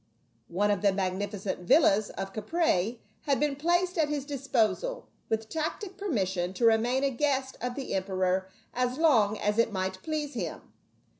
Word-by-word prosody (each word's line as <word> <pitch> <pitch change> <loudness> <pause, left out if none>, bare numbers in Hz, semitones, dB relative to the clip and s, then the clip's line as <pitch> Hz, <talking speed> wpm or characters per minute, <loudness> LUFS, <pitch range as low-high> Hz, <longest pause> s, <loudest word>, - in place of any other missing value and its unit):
One 205 +4 +1
of 200 - 0
the 200 -1 +4
magnificent 195 +1 -2
villas 205 - +4
of 195 0 -6
Caprae 220 - 0 0.3
had 275 -2 +2
been 295 -1 +1
placed 350 +4 +1
at 300 -2 +3
his 290 -2 -2
disposal, 275 - 0 0.2
with 220 0 -1
tacit 325 - -3
permission 190 - -1
to 235 - +1
remain 235 +4 +3
a 275 - +2
guest 265 0 0
of 245 0 -3
the 275 - -4
emperor 190 -1 0 0.2
as 250 +1 0
long 225 -10 +4
as 210 +2 0
it 230 -1 +3
might 190 -1 -3
please 305 -2 -3
him. - - -5
230 Hz, 160 wpm, -29 LUFS, 195-295 Hz, 0.3 s, the